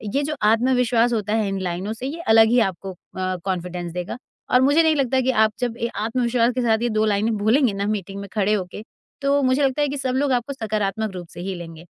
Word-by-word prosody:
ये 285 - +2
जो 305 +1 -2
आत्मविश्वास 240 +1 +3
होता 215 -1 -1
है 220 -2 +1
इन 195 0 -3
लाइनों 185 +4 -3
से, 250 +4 -6
ये 330 +4 -5
अलग 225 0 +7
ही 245 +1 +4
आपको 190 +2 -9
अ, 185 +1 -5
कॉन्फिडेंस 180 -2 -3
देगा 180 +6 -5 0.3
और 250 - +5
मुझे 290 +5 +4
नहीं 315 -1 +3
लगता 265 -1 +1
कि 260 +1 +1
आप 220 -2 +3
जब 240 -2 -2
ये 235 - +1 0.2
आत्मविश्वास 240 0 +1
के 255 - 0
साथ 225 -1 +2
ये 240 - +1
2 215 -1 +1
लाइनें 215 +2 +1
बोलेंगे 225 +2 +2
ना 200 +1 -2
मीटिंग 200 -2 -3
में 200 - -7
खड़े 210 -1 +1
होके, 195 +1 -4 0.4
तो 280 +1 +2
मुझे 255 +2 +2
लगता 270 +2 +1
है 290 - +2
कि 285 - -4
सब 260 -1 -2
लोग 275 0 +1
आपको 245 +3 -1
सकारात्मक 215 -3 -2
रूप 175 -2 -7
से - - -7
ही 190 +2 -3
लेंगे। 165 -1 -10
225 Hz, 240 wpm, -22 LUFS, 195-255 Hz, 0.4 s, अलग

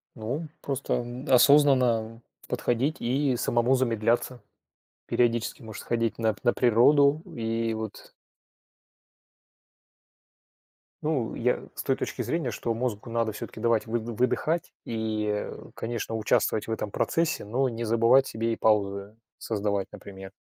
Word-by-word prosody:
Ну, 115 +4 -3
м, 160 - -8
просто, 140 -1 -2
м, 120 +1 -5
осознанно 125 -4 +4 0.3
подходить 130 +6 0
и 130 +1 +1
самому 120 +3 +2
замедляться, 120 -1 0 0.6
периодически, 120 +1 0
может, 110 -1 -8
сходить 115 -1 -1
на 110 -2 +1
на 120 - +4
природу 140 +5 +4
и 115 0 -1
вот 110 -1 -7 2.9
Ну, 145 -7 -1
я 125 +1 +1
с - - -5
той 135 - +1
точки 130 - -4
зрения, 125 +2 -1
что 115 +2 -3
мозгу 115 -2 -3
надо 115 -1 0
всё-таки 105 - -8
давать 115 -1 +1
выды 115 0 -2
выдыхать 125 +8 0
и, 110 -1 -2
э, 105 0 -3
конечно, 115 -1 -4
участвовать 110 0 +1
в - - -4
этом 105 -2 -3
процессе, 165 +9 0
но 125 +6 0
не 115 0 -4
забывать 115 +4 +4
себе 115 +1 -1
и - - -2
паузы 100 -1 +1 0.2
создавать, 100 -3 -1
например. 95 -1 -10
115 Hz, 130 wpm, -27 LUFS, 110-125 Hz, 2.9 s, осознанно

